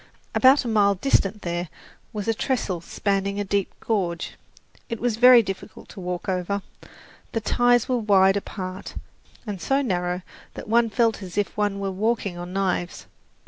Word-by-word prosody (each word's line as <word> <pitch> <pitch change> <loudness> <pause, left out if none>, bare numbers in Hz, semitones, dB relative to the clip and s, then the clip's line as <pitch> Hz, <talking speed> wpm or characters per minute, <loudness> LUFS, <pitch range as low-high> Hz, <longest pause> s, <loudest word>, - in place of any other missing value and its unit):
About 265 +1 +5
a - - -2
mile 205 -3 +3
distant 205 -2 +1
there 175 0 -3 0.4
was 210 -3 -5
a 225 - +3
trestle 215 - -1
spanning 200 +2 -1
a - - 0
deep 200 -1 -1
gorge. 180 -7 -1 0.6
It 230 -2 -4
was 240 -2 0
very 250 0 +8
difficult 195 -1 -7
to 205 - -10
walk 180 +1 -4
over, 190 +1 -1 0.7
the 225 - +1
ties 245 +2 +3
were 250 -1 +1
wide 195 -3 +4
apart 190 -2 -5 0.5
and 200 -5 -5
so 275 +1 +1
narrow 180 -5 -1 0.3
that - - -8
one 230 +1 +3
felt 225 -1 +1
as 185 -1 -8
if 205 - -1
one 205 -1 0
were 195 -1 -2
walking 205 -1 -1
on 175 +1 -7
knives. 185 -2 -2
200 Hz, 165 wpm, -24 LUFS, 185-225 Hz, 0.7 s, very